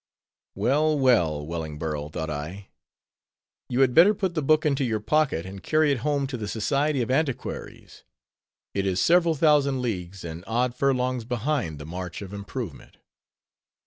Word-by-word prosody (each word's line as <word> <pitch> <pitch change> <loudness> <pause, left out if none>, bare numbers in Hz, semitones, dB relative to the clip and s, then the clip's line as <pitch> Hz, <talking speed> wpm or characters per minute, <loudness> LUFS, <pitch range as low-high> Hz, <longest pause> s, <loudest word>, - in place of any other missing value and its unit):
Well, 150 +4 +2
well, 85 - +2
Wellingborough, 75 -2 -4
thought 80 0 -4
I, 85 +7 -6 1.0
you 125 +2 +1
had 130 -2 +4
better 185 +8 +7
put 190 -3 -1
the 160 - -1
book 155 +2 +3
into 140 -2 +2
your 115 -4 0
pocket, 135 - +1
and 95 0 -8
carry 155 -1 +2
it 135 - 0
home 145 +2 0
to 130 -2 -4
the 105 -2 -5
Society 140 +6 0
of 120 - -3
Antiquaries; 135 -1 -3 0.7
it 100 0 -1
is 95 -1 0
several 170 -1 +4
thousand 145 -3 +3
leagues 95 -7 -4
and 85 +1 -7
odd 120 +2 0
furlongs 125 -2 0
behind 125 - -2
the 75 - -8
march 90 +3 -6
of 95 0 -9
improvement. 100 - -7
125 Hz, 155 wpm, -25 LUFS, 90-145 Hz, 1.0 s, better